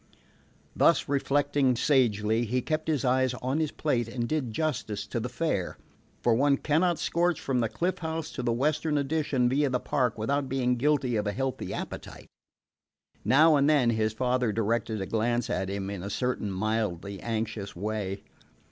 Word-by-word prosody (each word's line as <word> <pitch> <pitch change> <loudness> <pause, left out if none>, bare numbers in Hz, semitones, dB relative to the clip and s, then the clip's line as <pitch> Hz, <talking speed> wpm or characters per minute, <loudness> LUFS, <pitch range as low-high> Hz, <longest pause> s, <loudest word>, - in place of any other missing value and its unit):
Thus - - +4
reflecting 140 -1 +2
sagely, 115 -4 +2
he 125 +3 -1
kept 155 0 -2
his 150 -5 0
eyes 130 0 +2
on 130 +4 -2
his 155 -2 0
plate 125 -8 -1
and 120 0 -3
did 145 -6 -1
justice 110 -7 -2
to 115 - -3
the 120 +2 -3
fare; 115 - -2 0.5
for 120 - +4
one 140 +4 +3
cannot 165 +4 +1
scorch 175 -1 +1
from 130 -2 -1
the 115 -2 +1
Cliff 180 - -2
House 160 -1 -4
to 125 - -5
the 120 -1 0
Western 150 +5 0
Addition 140 -3 +1
via 140 +3 +2
the 125 -1 0
park 125 -4 0
without 135 +5 -1
being 125 -2 +1
guilty 130 -2 +1
of 105 0 -1
a - - +1
healthy 135 +2 -3
appetite. - - -7 1.0
Now 155 +4 +5
and 140 +1 +3
then 135 -6 +4
his 110 -1 +1
father 125 0 +1
directed 110 0 -1
a - - -2
glance 120 +3 0
at 95 +1 -1
him 100 0 -3
in 100 -3 -5
a 100 - -5
certain 125 -3 -1
mildly 100 -1 -2
anxious 110 -3 -3
way. 100 0 -3
125 Hz, 175 wpm, -28 LUFS, 110-145 Hz, 1.0 s, Now